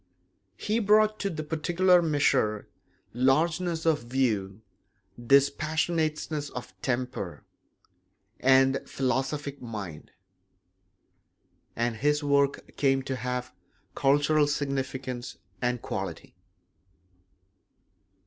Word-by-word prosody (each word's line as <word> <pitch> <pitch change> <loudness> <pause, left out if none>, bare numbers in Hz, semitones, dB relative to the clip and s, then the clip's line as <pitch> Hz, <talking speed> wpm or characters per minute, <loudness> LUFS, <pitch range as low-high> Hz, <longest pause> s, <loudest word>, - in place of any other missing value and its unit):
He 215 +2 0
brought 215 0 +3
to 200 - -1
the 155 -4 -4
particular 175 +4 +3
measure 140 -9 +1 0.5
largeness 160 +7 +1
of 160 -5 +2
view, 110 -5 -1 0.6
dispassionateness 155 +2 +1
of 120 -6 -8
temper, 125 -7 -3 1.0
and 135 0 +5
the - - -1
philosophic 135 +2 -2
mind; 105 -10 -7 1.7
and 115 -1 -1
his 150 +3 +1
work 140 -1 +1
came 135 -1 +2
to 130 0 -3
have 125 0 -4 0.4
cultural 145 +2 +3
significance 135 -3 -3 0.2
and 125 -1 -1
quality. - - -5
140 Hz, 85 wpm, -27 LUFS, 125-155 Hz, 1.7 s, and